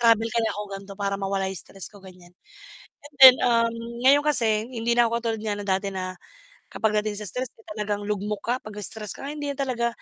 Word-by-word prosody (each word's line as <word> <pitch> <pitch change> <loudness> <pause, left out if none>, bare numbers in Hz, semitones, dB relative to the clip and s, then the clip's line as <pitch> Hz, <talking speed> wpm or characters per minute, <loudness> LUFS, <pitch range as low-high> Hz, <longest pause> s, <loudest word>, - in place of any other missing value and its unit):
"Travel 230 -1 +4
kaya 230 0 0
ako, 210 - -4
ganito, 195 0 -9
para 200 0 -1
mawala 195 -1 -1
'yong 190 - -5
stress 195 -1 -6
ko?" 205 - -15
Ganiyan. 180 -2 -15 0.7
And 290 0 -13
then, 260 -1 +12
um, 230 -1 +3 0.3
ngayon 285 +2 +6
kasi 225 -6 +2
hindi 235 0 0
na 240 - +5
ako 235 0 -1
katulad 225 -2 -2
nga 210 -1 -1
na 205 - -6
dati 190 +1 0
na 185 -1 -4 0.6
kapag 215 -1 0
dating 210 -1 -3
sa 210 - -4
stress, 250 +5 -3
eh, 455 - -21
talagang 205 -1 -3
lugmok 210 0 -3
ka. 240 - 0
'Pag 215 - -10
na-stress 210 0 -2
ka, 275 - -7
hindi 295 -1 -4
na - - -16
talaga. 245 -3 0
215 Hz, 220 wpm, -25 LUFS, 200-235 Hz, 0.7 s, then